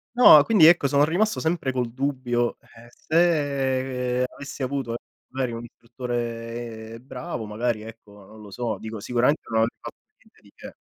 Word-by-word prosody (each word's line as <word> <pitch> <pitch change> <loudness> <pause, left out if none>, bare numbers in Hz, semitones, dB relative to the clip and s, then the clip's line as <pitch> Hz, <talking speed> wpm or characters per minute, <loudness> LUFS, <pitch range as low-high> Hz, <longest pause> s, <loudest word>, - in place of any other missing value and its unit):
No, 155 -12 +9
quindi 195 -6 +5
ecco 165 -5 +6
sono 145 +1 +4
rimasto 210 +8 0
sempre 160 -4 -1
col 125 -2 -2
dubbio: 125 -3 -1
eh, 115 +1 -18
se 135 -6 0
avessi 140 0 -9
avuto 130 -3 -2 0.3
magari 130 -2 -3
un 115 - -6
istruttore 115 -1 -6
bravo, 130 -1 -6
magari 110 +1 -2
ecco, 105 -3 -13
non 110 +2 -15
lo 105 -2 -12
so, 115 -1 -3
dico 110 +2 -7
sicuramente 125 +7 +1
non 110 -1 +1
avrei 115 +1 -1
fatto - - -9 0.2
niente - - -27
di - - -21
che. - - -11
125 Hz, 160 wpm, -24 LUFS, 115-140 Hz, 0.3 s, No